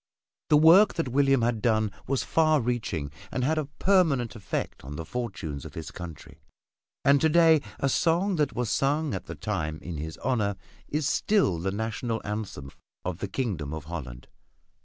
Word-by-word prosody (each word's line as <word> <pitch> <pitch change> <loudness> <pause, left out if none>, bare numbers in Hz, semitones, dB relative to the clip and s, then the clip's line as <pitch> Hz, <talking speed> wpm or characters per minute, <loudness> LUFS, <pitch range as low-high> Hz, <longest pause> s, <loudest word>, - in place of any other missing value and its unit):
The 150 - +6
work 170 +7 +7
that 165 -6 -1
William 135 -1 +3
had 115 -2 0
done 110 -2 +2 0.2
was 135 -1 0
far 155 -1 +3
reaching 110 - -2 0.2
and 125 - -1
had 155 +4 +2
a 155 - -2
permanent 145 - +2
effect 105 -4 -4
on 70 +3 -7
the 80 - -5
fortunes 95 - -5
of - - -10
his - - -6
country. 85 -4 -10 0.6
And 140 0 +5
to 160 - +4
day 160 -1 +5 0.2
a 135 - +1
song 170 +7 +2
that 150 -3 0
was 125 -1 -1
sung 145 +1 +1
at 95 - -5
the - - -6
time 75 0 -3
in 85 -3 -5
his 80 +2 -6
honor 110 -5 0 0.3
is 150 -1 -1
still 175 - +2
the 95 +3 -1
national 110 +2 -2
anthem 105 -10 -5 0.3
of 90 -1 -3
the 100 - -3
Kingdom 90 - -3
of 80 - -6
Holland. 65 -7 -7
120 Hz, 180 wpm, -27 LUFS, -, 0.6 s, work